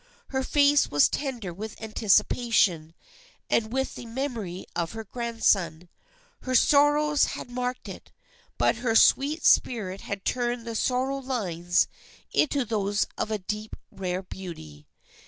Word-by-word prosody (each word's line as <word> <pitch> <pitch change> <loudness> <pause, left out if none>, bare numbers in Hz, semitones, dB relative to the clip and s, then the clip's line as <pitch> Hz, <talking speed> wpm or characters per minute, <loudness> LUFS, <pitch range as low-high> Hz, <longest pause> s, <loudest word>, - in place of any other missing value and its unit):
Her 265 -1 -1
face 285 +1 +3
was 145 -1 +5
tender 240 -11 -4
with 215 +4 -8
anticipation, 210 -6 +2 0.6
and 220 -1 +1
with 265 +1 -1
the 240 - -9
memory 230 -8 -4
of 170 +1 -2
her 225 0 -6
grandson. 195 -7 0 0.5
Her 255 0 -2
sorrows 295 +2 +4
had 245 - -9
marked 250 0 -3
it, - - -10 0.5
but - - +2
her 230 -1 -1
sweet 285 +7 +4
spirit 195 -6 +2
had 200 -1 -6
turned 240 -1 -1
the 230 - -5
sor 250 +3 0
row 275 0 -2
lines 180 -10 0 0.5
into 285 -3 +2
those 205 -2 0
of - - -3
a 215 - -1
deep 210 +2 -5 0.2
rare 185 0 -3
beauty. 120 - -10
225 Hz, 140 wpm, -26 LUFS, 190-255 Hz, 0.6 s, was